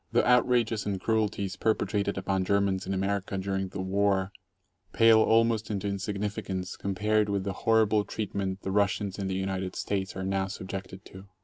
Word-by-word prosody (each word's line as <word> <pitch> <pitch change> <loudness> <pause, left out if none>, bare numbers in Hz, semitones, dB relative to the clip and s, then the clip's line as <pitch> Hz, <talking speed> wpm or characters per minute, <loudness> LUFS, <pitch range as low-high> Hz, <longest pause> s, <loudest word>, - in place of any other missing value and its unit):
The - - +3
outrages 120 -3 +3
and 100 -2 -1
cruelties 105 -2 -1
perpetrated 100 -1 0
upon 95 0 0
Germans 100 -1 +1
in 95 - -1
America 95 0 -1
during 95 0 -2
the 95 +1 -6
war 100 0 +1 0.6
pale 115 -1 +6
almost 115 0 +3
into 100 -1 -2
insignificance 100 -1 -3
compared 105 +2 0
with 100 -1 0
the 100 0 -3
horrible 110 0 +3
treat 105 0 -5
ment 95 -1 -3
the 95 - -2
Russians 100 0 0
in 100 - -2
the 95 - -2
United 95 -1 -3
States 95 -2 -2
are 95 - -4
now 95 0 0
subjected 95 0 -7
to. 95 +1 -12
100 Hz, 170 wpm, -28 LUFS, 95-105 Hz, 0.6 s, pale